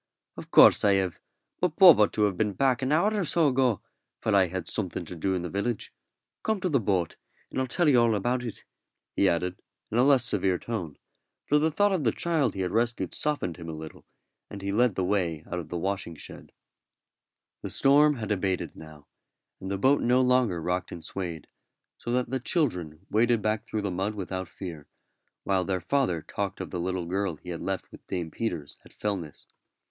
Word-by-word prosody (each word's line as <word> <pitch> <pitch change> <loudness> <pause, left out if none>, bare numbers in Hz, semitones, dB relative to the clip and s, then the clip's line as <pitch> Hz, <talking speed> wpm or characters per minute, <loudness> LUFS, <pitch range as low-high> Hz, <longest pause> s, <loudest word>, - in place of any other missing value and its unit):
"Of - - -9
course - - +7
I 100 -1 +5
have, 95 -3 0 0.4
but 175 -4 0
Bob 180 - +9
ought 105 - +4
to 105 - +1
have 100 -3 +2
been 105 +2 0
back 130 +1 +2
an 130 +1 -1
hour 175 +8 +3
or 205 -2 0
so 160 -1 +3
ago, 125 -5 +1 0.4
for 110 - -1
I 95 -2 +5
had 90 -1 -5
something 90 -4 -2
to 90 - -8
do 95 +3 -1
in 90 - -2
the - - -3
village. 105 +4 -3 0.5
Come 220 -2 0
to 185 - 0
the 140 -4 +3
boat, 95 -6 -1 0.3
and 130 - -1
I'll 130 - -1
tell 175 +6 +1
you 130 -5 +5
all 115 -2 +3
about 120 +5 -1
it," 115 -4 -7 0.5
he 100 - +4
added, 90 +1 -2 0.3
in 115 - +1
a - - +6
less 135 -3 +5
severe 95 -5 +1
tone; 90 -9 -5 0.5
for 150 - +3
the 155 +2 +2
thought 205 +6 +2
of 185 -6 0
the 115 - +3
child 160 -5 0
he 95 - -3
had 90 -1 -1
rescued 120 +1 0
softened 145 - -2
him 85 -2 -8
a - - -5
little, 80 0 -10 0.4
and 100 -1 -8
he 100 - -1
led 115 0 +2
the 95 - 0
way 90 -5 0
out 90 - -4
of 80 -3 -8
the 90 - -3
washing 95 -1 -3
shed. - - -11 1.1
The - - -5
storm 145 +2 +4
had 110 -4 -5
abated 95 -2 -1
now, 75 -2 -13 0.5
and 95 - -6
the 100 - -1
boat 135 +8 +3
no 125 +2 +3
longer 125 -8 +2
rocked 90 +2 -2
and 85 - -8
swayed, 85 -5 -5 0.5
so 120 - -5
that 125 -1 0
the 130 - 0
children 90 - -2
waded 115 0 +2
back 110 +1 -1
through 110 -1 -3
the 100 - -1
mud 95 +4 -2
without 95 -2 -4
fear, 85 -5 -8 0.6
while 95 -2 +1
their 95 0 -1
father 90 - 0
talked 100 +4 -4
of 95 - -6
the 90 - -3
little 90 0 -2
girl 95 0 -1
he 90 +4 -12
had 85 -2 -5
left 95 -1 -4
with - - -13
Dame 85 -4 -3
Peters 85 -10 -4
at - - -18
Fellness. 95 -8 -4
100 Hz, 215 wpm, -27 LUFS, 90-125 Hz, 1.1 s, Bob